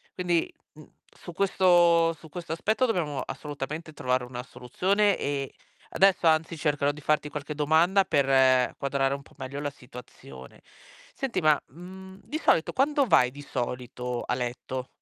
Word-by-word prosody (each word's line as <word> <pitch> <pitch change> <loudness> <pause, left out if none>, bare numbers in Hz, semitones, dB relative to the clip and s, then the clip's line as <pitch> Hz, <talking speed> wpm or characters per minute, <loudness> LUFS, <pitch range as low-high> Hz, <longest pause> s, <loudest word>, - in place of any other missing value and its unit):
quindi, 175 -2 0 0.2
uhm, 155 0 -16 0.2
su 175 - -11
questo 175 -3 +4
su 160 0 -16
questo 165 0 -6
aspetto 220 +9 +1
dobbiamo 155 -10 -1
assolutamente 150 +2 -6
trovare 125 -2 -1
una 125 0 -7
soluzione 195 - 0
e 140 -1 -3 0.4
adesso 190 -2 +3
anzi 160 +1 +2
cercherò 145 -1 +1
di 150 - -12
farti 150 0 0
qualche 150 +1 -6
domanda 160 +6 +3
per 135 -5 +3
quadrare 140 0 0
un 140 - -9
po' - - -21
meglio 135 +1 -6
la 145 - -2
situazione. 90 - -13 0.5
Senti, 270 -3 -2
ma, 155 -3 +4
mhmm, 190 +4 -12
di 305 - -4
solito 160 - +2
quando 280 +1 +2
vai 125 -8 +4
di 145 - -11
solito 125 -2 -4
a 125 - -1
letto? 125 +1 -4
150 Hz, 150 wpm, -27 LUFS, 130-175 Hz, 0.5 s, questo